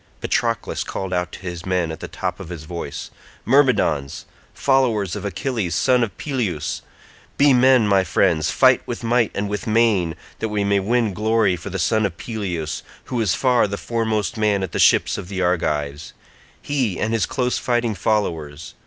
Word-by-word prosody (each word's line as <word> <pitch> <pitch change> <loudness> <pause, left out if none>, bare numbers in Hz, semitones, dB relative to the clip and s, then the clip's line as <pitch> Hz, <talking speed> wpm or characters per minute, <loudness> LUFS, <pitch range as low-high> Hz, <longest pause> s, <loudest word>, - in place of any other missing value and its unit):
Patroclus - - -1
called 95 -1 -4
out 90 0 -1
to - - -8
his 85 -3 -6
men 90 -3 0
at 80 - -7
the - - -6
top - - -4
of - - -8
his 85 -4 -7
voice, 85 +2 -6 0.3
"Myrmidons, 115 - +2 0.3
followers 120 -9 +1
of - - -5
Achilles 100 - -2
son 125 +3 +3
of 110 - -4
Peleus, 110 - -2 0.6
be 140 -1 +5
men 125 -2 +5
my 100 -2 +4
friends, 80 -2 +2
fight 130 -1 +4
with 120 0 -5
might 115 -1 +2
and 100 +1 -1
with 105 +2 -4
main, 105 -7 +2 0.2
that 110 - -2
we 105 -1 0
may 100 0 +2
win 110 +1 +1
glory 110 -1 +2
for 90 +4 -7
the 95 - -4
son 110 +4 +1
of 85 -3 -11
Peleus, 90 -9 -4 0.2
who 120 -2 -2
is 105 -5 +1
far 125 -4 +3
the 100 0 -4
foremost 110 -4 -1
man 105 -3 +1
at 95 - -4
the - - -3
ships - - +4
of - - -8
the 95 0 -5
Argives—he, 90 - -3
and 110 +1 -1
his 115 - +1
close 125 -1 -1
fighting 120 -2 0
followers. 80 -9 -2
105 Hz, 180 wpm, -21 LUFS, 90-115 Hz, 0.6 s, be